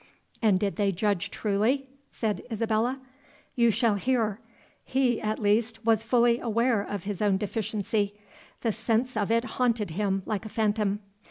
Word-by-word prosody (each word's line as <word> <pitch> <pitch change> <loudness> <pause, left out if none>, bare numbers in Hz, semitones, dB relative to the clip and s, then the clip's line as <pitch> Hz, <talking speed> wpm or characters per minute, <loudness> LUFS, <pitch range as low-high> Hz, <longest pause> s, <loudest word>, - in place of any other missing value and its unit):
"And 210 -5 +4
did 200 0 -1
they 200 -2 +2
judge 200 -1 0
truly?" 225 +7 0 0.2
said 215 -3 -2
Isabella. 230 +4 0 0.6
"You 235 -1 +4
shall 225 0 +2
hear. 220 -1 0 0.4
He, 255 -3 +1
at 215 0 -1
least, 225 +2 +1
was 225 -2 +4
fully 235 +1 +3
aware 230 -1 +1
of 200 -2 -5
his 205 -1 -4
own 205 -2 +3
deficiency; 205 0 -1 0.5
the 230 - +1
sense 225 +3 0
of 205 -1 0
it 230 +1 +3
haunted 235 -5 0
him 195 +1 -1
like 215 -2 -2
a 220 - -7
phantom. 210 -2 0
220 Hz, 155 wpm, -27 LUFS, 205-235 Hz, 0.6 s, And